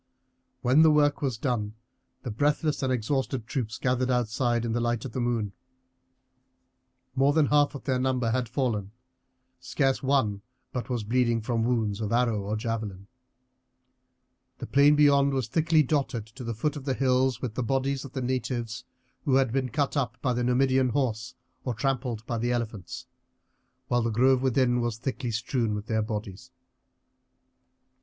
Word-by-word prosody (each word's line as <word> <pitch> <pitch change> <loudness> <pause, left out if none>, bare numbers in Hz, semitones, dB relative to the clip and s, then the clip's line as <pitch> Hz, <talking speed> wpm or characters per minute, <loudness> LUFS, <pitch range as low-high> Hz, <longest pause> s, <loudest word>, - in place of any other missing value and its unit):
When 130 +5 +5
the 160 - +7
work 145 -1 +3
was 130 -5 -1
done 110 -4 -2 0.5
the 120 - -4
breathless 145 +6 0
and 130 -1 0
exhausted 130 0 -1
troops 115 -3 -3
gathered 125 0 0
outside, 120 -1 0
in 115 - -2
the 120 - 0
light 120 0 -1
of 130 - -5
the 130 - -4
moon. 115 -4 -1 1.6
More 135 +2 +3
than 155 -1 +4
half 145 0 +3
their 130 -2 0
number 130 -3 0
had 125 -1 -1
fallen; 115 -6 -2 0.7
scarce 135 -2 0
one 130 -8 +1 0.3
but 125 0 -4
was 120 -4 -1
bleeding 120 +1 +1
from 115 0 -1
wounds 115 -3 0
of 105 - -2
arrow 115 -3 +2
or 100 +2 -3
javelin. 110 -4 -4 1.5
The - - -6
plain 140 +2 +5
beyond 140 -2 +4
was 130 -5 -1
thickly 160 +4 +3
dotted 135 -6 -1
to 115 +4 -11
the 115 -1 -4
foot 150 +7 -1
of 140 -2 -7
the 135 -2 0
hills 130 -2 +2
with 125 -4 -4
the 130 - -2
bodies 135 +2 -1
of 135 - -10
the 130 - -3
natives 125 -2 -3 0.4
who 135 - +3
had 135 -3 +3
been 130 -1 0
cut 140 +5 -1
up 130 -3 -1
by 125 -1 0
the 120 0 -1
Numidian 130 +1 +3
horse 120 -3 -2 0.3
or 125 -3 -2
trampled 120 -3 -2
by 120 -2 -2
the 120 +2 0
elephants, 110 -7 -4 0.8
while 120 -1 +2
the 115 - 0
grove 125 +3 +3
within 130 -2 +2
was 120 -2 -2
thickly 125 0 -3
strewn 115 -1 -1
with 105 0 -5
their 110 -1 0
bodies. 105 -3 -5
125 Hz, 165 wpm, -27 LUFS, 115-135 Hz, 1.6 s, the